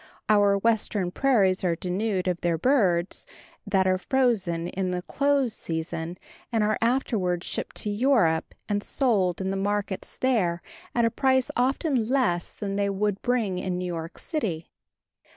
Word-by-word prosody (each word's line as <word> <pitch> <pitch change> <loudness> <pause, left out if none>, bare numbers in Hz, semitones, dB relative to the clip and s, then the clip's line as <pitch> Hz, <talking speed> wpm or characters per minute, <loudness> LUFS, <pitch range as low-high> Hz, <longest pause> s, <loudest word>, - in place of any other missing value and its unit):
Our 205 -1 +5
Western 210 -3 +1
prairies 200 -8 +2
are 175 -2 +2
denuded 185 +2 -1
of 180 -2 -1
their 170 -1 +1
birds, 190 - +1 0.4
that 195 -2 +2
are 185 0 +2
frozen 195 -10 +1
in 190 -1 -2
the 180 0 -2
close 280 -1 +1
season 165 -1 -4 0.3
and 225 -2 +2
are 215 +1 +1
afterward 220 -8 +1
shipped - - -5
to 210 - -1
Europe, 205 -8 +2
and 205 -1 0
sold 205 -9 +1
in 190 0 -1
the 195 - -2
markets 200 0 -2
there 190 -10 +1 0.3
at 235 -1 +3
a 230 - +2
price 260 0 +2
often 255 -1 +1
less 240 -11 +1
than 200 -1 -4
they 200 0 +1
would 200 0 -1
bring 225 -7 0
in 185 -1 -2
New 180 - -3
York 165 -2 -5
city. 195 - -3
200 Hz, 155 wpm, -26 LUFS, 180-235 Hz, 0.4 s, Our